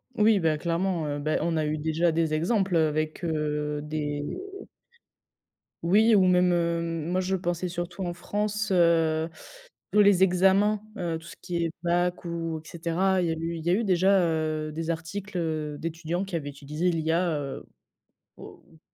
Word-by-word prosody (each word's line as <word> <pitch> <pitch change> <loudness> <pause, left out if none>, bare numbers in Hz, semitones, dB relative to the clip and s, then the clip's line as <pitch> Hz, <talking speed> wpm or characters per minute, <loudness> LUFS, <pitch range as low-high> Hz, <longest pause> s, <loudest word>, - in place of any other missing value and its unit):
Oui, 215 -1 +4
bah 160 -3 +1
clairement, 170 +1 -1
heu, 145 0 -2
beh 155 +2 0
on 165 -1 0
a 155 - +1
eu 150 +1 -1
déjà 160 +2 +1
des 160 -1 0
exemples, 190 +3 +1
heu, 160 -1 +4
avec, 155 +3 -2
heu, 150 -2 -1
des 150 -1 -3 1.6
Oui 215 +6 +5
ou 190 -2 +5
même, 180 0 +4
hem, 170 -1 -1
moi 185 - +1
je 190 +1 0
pensais 175 0 -2
surtout 175 +2 -4
en 175 -1 -2
France, 210 +3 -2
heu, 165 -2 +3 0.6
tous 210 - +5
les 200 -2 +5
examens, 195 +3 +3 0.2
heu, 170 -3 -2
tout 165 - -14
ce - - -10
qui 175 -2 -3
est 165 - -2
bac 175 +1 0
ou 165 -2 -3
et - - -16
cetera. 180 +3 0
Il 175 - 0
y - - +1
a - - -1
eu 165 +1 -3
il 160 - -8
y - - +1
a 175 - +4
eu, 225 - +1
déjà 190 0 +4
heu, 155 -2 -1
des 160 +2 -4
articles, 180 +4 -4
heu, 155 -3 -2
d'étudiants 165 +3 -3
qui 190 -2 -5
avaient 145 -3 -3
utilisé 150 +5 -2
l'IA, 165 +2 +1
heu, 140 -1 -6 0.7
o - - -12
ou - - -21
170 Hz, 185 wpm, -27 LUFS, 155-185 Hz, 1.6 s, Oui